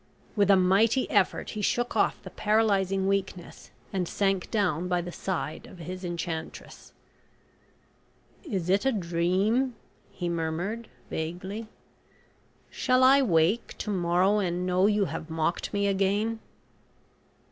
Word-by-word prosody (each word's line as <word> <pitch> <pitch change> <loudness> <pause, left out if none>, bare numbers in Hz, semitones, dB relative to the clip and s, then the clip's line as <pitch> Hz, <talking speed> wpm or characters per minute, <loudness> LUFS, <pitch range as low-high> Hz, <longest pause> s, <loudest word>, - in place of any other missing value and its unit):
With 205 -2 +3
a 200 - +8
mighty 200 +7 +3
effort - - +1
he 215 - -4
shook 240 +4 0
off - - +2
the - - -9
paralysing 195 -3 +1
weakness, 190 -3 -3 0.2
and 185 -3 -1
sank 195 -1 0
down 180 -6 0
by 180 -1 +1
the 175 0 -5
side 175 -4 -4
of - - -13
his 180 +3 -7
enchantress. 170 -2 -6 1.5
"Is 195 - -3
it 195 +3 +2
a 270 - +3
dream?" 195 +6 +1 0.3
he 175 - -5
murmured, 170 +7 -3 0.2
vaguely; 185 +7 -4 1.0
"shall 255 0 +2
I 270 +2 +7
wake 185 0 +1
to 210 - -4
morrow 185 +2 +2
and 180 -2 -1
know 185 +2 +3
you 210 -1 +2
have 165 -1 -6
mocked 160 +1 -1
me 200 -1 0
again?" 200 +3 +1
190 Hz, 130 wpm, -27 LUFS, 175-210 Hz, 1.5 s, a